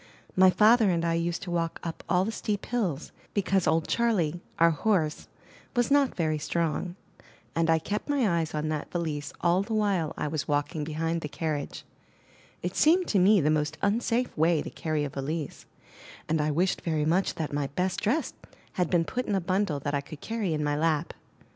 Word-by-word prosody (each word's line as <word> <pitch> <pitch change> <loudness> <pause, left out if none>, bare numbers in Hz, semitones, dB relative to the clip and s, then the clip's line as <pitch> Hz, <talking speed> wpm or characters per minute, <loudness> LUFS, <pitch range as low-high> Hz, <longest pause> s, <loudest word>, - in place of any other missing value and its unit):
My 185 0 +7
father 220 +2 +5
and 170 -2 +1
I 165 - +1
used 170 +1 -1
to 180 - -5
walk 165 -1 -1
up 165 -1 -5
all 180 +1 +3
the 220 - -2
steep 210 -2 -3
hills, 190 - -2 0.2
because 195 -2 +1
old 160 0 +2
Charley, 180 -9 +1 0.2
our 165 0 +5
horse, 160 -2 0 0.5
was 245 +2 +1
not 285 -2 +3
very 155 -3 0
strong; 170 +3 -1 0.6
and 165 0 +1
I 165 - +5
kept 205 - -4
my 280 -5 +2
eyes 160 -1 -3
on 155 0 -1
that 155 -1 -3
valise 155 -4 -3
all 175 +2 +3
the 220 +2 -3
while 195 -7 0
I - - -2
was 150 -2 -3
walking 145 +1 -1
behind 165 +2 -2
the 150 - -5
carriage; 150 -2 -3 0.8
it 180 +1 -3
seemed 350 +4 +4
to 200 - +3
me 195 +1 +5
the 150 +1 +2
most 155 +1 0
unsafe 230 +4 +1
way 160 0 +2
to - - -7
carry 155 -2 -2
a 145 - -2
valise, 145 +3 -4 0.6
and 160 0 +1
I 150 - +1
wished 175 +5 +1
very 155 -3 0
much 180 +5 +1
that 155 -3 -4
my 145 -1 0
best 180 +6 -2
dress 275 +10 0 0.4
had 180 -3 0
been 170 -2 +2
put 250 +7 -3
in 205 - +1
a - - +2
bundle 185 -4 0
that 145 +1 -2
I 140 - +1
could 145 +1 -10
carry 215 -6 -2
in 150 - -1
my 145 0 0
lap. 155 +1 0
170 Hz, 200 wpm, -28 LUFS, 155-200 Hz, 0.8 s, My